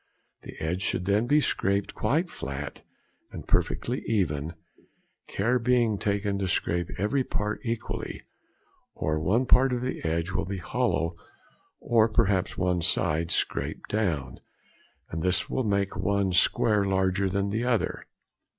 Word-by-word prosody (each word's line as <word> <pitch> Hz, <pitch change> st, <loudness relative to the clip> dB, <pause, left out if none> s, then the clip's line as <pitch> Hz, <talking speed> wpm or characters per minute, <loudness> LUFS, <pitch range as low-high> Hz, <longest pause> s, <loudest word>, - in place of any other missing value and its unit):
The -, -, -10 dB
edge 85 Hz, +4 st, -2 dB
should 90 Hz, -2 st, -1 dB, 0.2 s
be 150 Hz, +3 st, +5 dB
scraped 100 Hz, -6 st, 0 dB
quite 150 Hz, +12 st, +1 dB
flat 70 Hz, +1 st, -6 dB, 0.5 s
and -, -, -8 dB
perfectly 125 Hz, +3 st, 0 dB
even, 80 Hz, -7 st, 0 dB, 0.7 s
care 120 Hz, +6 st, +1 dB
being 120 Hz, -3 st, +2 dB
taken 100 Hz, -1 st, 0 dB
to 95 Hz, -, -1 dB
scrape 85 Hz, -1 st, 0 dB
every 105 Hz, +8 st, +1 dB
part 105 Hz, -3 st, -2 dB
equally, 115 Hz, -1 st, -4 dB, 0.7 s
or 75 Hz, 0 st, -1 dB
one 105 Hz, +11 st, +2 dB
part 130 Hz, +1 st, +5 dB
of 125 Hz, -1 st, -1 dB
the 130 Hz, -, -3 dB
edge 85 Hz, +2 st, -1 dB
will 90 Hz, -, -1 dB
be 100 Hz, +2 st, -4 dB
hollow 85 Hz, -1 st, -1 dB, 0.6 s
or 115 Hz, -1 st, +3 dB
perhaps 100 Hz, -4 st, +1 dB
one 90 Hz, -1 st, +1 dB
side 80 Hz, 0 st, +1 dB
scraped -, -, -2 dB
down, 80 Hz, -, -1 dB, 0.7 s
and 80 Hz, -, -3 dB
this 90 Hz, +2 st, 0 dB
will 130 Hz, -, 0 dB
make 100 Hz, -1 st, 0 dB
one 95 Hz, +2 st, +1 dB
square 105 Hz, +3 st, +3 dB
larger 95 Hz, 0 st, +1 dB
than 100 Hz, +1 st, 0 dB
the 110 Hz, +3 st, -1 dB
other. 125 Hz, -3 st, 0 dB
100 Hz, 140 wpm, -27 LUFS, 85-110 Hz, 0.7 s, be